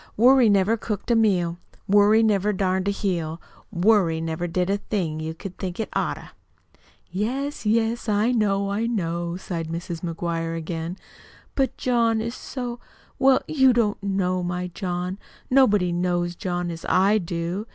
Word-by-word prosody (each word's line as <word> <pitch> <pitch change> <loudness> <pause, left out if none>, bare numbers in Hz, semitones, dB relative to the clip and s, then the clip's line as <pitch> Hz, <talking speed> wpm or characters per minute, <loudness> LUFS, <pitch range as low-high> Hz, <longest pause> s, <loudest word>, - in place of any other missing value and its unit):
Worry 250 +1 +6
never 200 +3 +3
cooked 210 +1 -3
a - - +4
meal, 180 -6 +2 0.3
Worry 205 +2 +5
never 210 -1 +2
darned 190 0 0
a - - +3
heel, 170 -5 -2 0.3
Worry 180 -3 +3
never 165 +1 -3
did 180 +1 0
a 200 +1 +1
thing 170 -8 -2
you'd 160 +1 -5 0.2
think 180 0 -4
it 220 - -2
oughter!" - - -2 0.8
"Yes, 250 +6 -2
yes, 225 +1 +1
I 210 +3 +2
know, 200 -4 +1
I 220 +3 0
know," 170 -5 -2
sighed 170 -3 -4
Mrs. 170 0 -5
McGuire 165 -1 -3
again. 165 +2 -4 0.6
"But 270 -1 0
John 230 -3 +2
is 230 +2 -3
so 245 -2 -6 0.4
well, 265 -1 +4
you 265 -4 +4
don't 220 -4 +1
know 190 -2 0
my 180 0 -3
John. 180 0 -3 0.3
Nobody 210 -9 +4
knows 175 0 0
John 175 -1 -3
as 165 0 -8
I 200 +4 +4
do. 175 +4 -3
195 Hz, 150 wpm, -24 LUFS, 175-220 Hz, 0.8 s, Worry